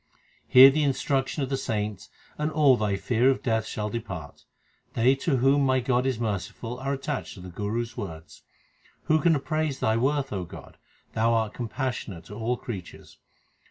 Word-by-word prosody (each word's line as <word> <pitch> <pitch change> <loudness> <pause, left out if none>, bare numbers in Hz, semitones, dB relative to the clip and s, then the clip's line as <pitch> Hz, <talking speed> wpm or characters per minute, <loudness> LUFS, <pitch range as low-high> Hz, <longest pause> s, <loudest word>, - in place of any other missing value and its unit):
Hear 130 +2 +9
the 155 +3 0
instruction 135 0 0
of 130 - -3
the 135 - 0
saints 105 -6 -3 0.3
and 150 +1 -2
all 150 -4 +5
thy 105 -4 0
fear 120 +5 +2
of 135 - 0
death 110 -2 0
shall 105 0 -3
depart. 95 -10 -7 0.5
They 120 +3 +4
to 140 -1 0
whom 135 +3 +3
my 130 -1 +3
God 125 +1 +1
is 130 -4 -1
merciful 115 +3 -4
are 135 +1 -2
attached 140 0 -4
to - - -12
the 90 0 -9
Guru 105 +6 -2
s 115 - -11
words. 85 -9 -8 0.6
Who 155 0 +2
can 170 -2 +4
appraise 155 0 -1
Thy 110 0 +1
worth, 135 +2 0
O 95 -2 -2
God? 85 - -12 0.3
Thou 115 +1 +2
art 110 -2 0
com 120 - -4
passionate 120 - -4
to - - -10
all 120 +3 -1
creatures. 100 -9 -9
120 Hz, 185 wpm, -26 LUFS, 105-135 Hz, 0.6 s, Hear